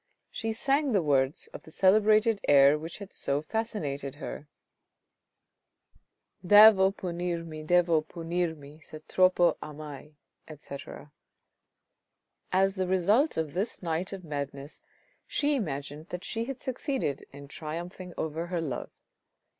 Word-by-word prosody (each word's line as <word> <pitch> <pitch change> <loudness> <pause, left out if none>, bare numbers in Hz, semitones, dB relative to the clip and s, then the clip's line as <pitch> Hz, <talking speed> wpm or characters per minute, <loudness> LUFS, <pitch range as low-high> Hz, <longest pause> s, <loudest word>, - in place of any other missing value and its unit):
She 225 -1 -3
sang 275 +4 +1
the 195 - +3
words 140 -1 +1
of - - -10
the - - -15
celebrated 215 +4 +4
air 140 0 +7
which 160 +2 -6
had 200 -1 -10
so 140 +1 -1
fascinated 150 - -3
her: 150 0 -7 0.9
— - - -43
Devo 205 0 +8
punirmi, 170 -4 -4
devo 170 -1 +3
punirmi. 165 -3 -4
Se 155 0 -11
troppo 185 -2 +3
amai, 150 0 -9 0.3
etc. 150 -1 -10 1.4
As 195 +1 +3
the 190 -2 -2
result 200 - +2
of 155 -3 -2
this 195 +2 -3
night 170 +2 -2
of 195 -2 -7
madness, 140 -1 -6 0.5
she 295 0 +1
imagined 150 - -4
that 180 +1 -6
she 225 +3 -3
had 270 0 -6
succeeded 260 - -3
in 140 0 -11
triumphing 170 +5 -7
over 160 +2 -3
her 175 -1 -2
love. 145 -7 -4
170 Hz, 125 wpm, -28 LUFS, 150-195 Hz, 1.4 s, Devo